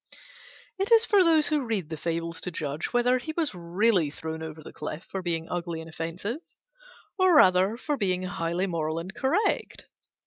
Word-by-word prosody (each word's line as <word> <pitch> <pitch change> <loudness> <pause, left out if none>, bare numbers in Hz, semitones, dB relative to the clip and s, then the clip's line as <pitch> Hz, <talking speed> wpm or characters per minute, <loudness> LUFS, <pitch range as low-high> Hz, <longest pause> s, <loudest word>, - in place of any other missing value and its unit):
It 390 +4 -1
is 455 0 +7
for 405 -4 +5
those 320 -3 +4
who 300 -2 +1
read 210 -9 -2
the 160 - -3
Fables 165 +1 -3
to - - -3
judge 150 -3 -4
whether 245 +1 +3
he 315 +5 -6
was 320 -7 0
really 180 0 +1
thrown 160 +2 -6
over 160 -1 -7
the - - -11
cliff 150 +2 -6
for 190 - -3
being 165 -2 -2
ugly 170 -2 -3
and 160 - -8
offensive, 165 - -4 0.8
or 370 -2 +5
rather 190 -4 +5
for 295 +3 -2
being 185 -4 0
highly 175 0 -1
moral 160 -3 -2
and 175 +3 -5
correct. 295 - 0
180 Hz, 180 wpm, -27 LUFS, 165-250 Hz, 0.8 s, is